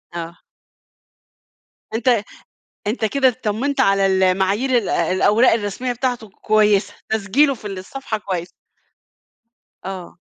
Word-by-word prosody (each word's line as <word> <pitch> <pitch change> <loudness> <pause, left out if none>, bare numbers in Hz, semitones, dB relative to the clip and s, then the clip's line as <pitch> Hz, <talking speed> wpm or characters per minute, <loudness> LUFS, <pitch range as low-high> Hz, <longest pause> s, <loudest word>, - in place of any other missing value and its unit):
آه. 170 0 -7 1.5
أنت 235 -1 +2 0.6
أنت 220 +1 0
كده 265 +4 +2
اتطمنت 255 +3 -1
على 195 -4 +3
ال 190 0 +2
المعايير 195 +8 +2
ال 220 -5 -1
الأوراق 205 +8 +3
الرسمية 225 +3 -2
بتاعته 245 -3 -3
كويسة. 210 0 +2 0.2
تسجيله 220 +7 +2
في 220 -4 -8
الصفحة 205 +5 -5
كويس. 185 -4 -4 1.4
آه. 185 -2 -7
210 Hz, 105 wpm, -20 LUFS, 190-245 Hz, 1.5 s, على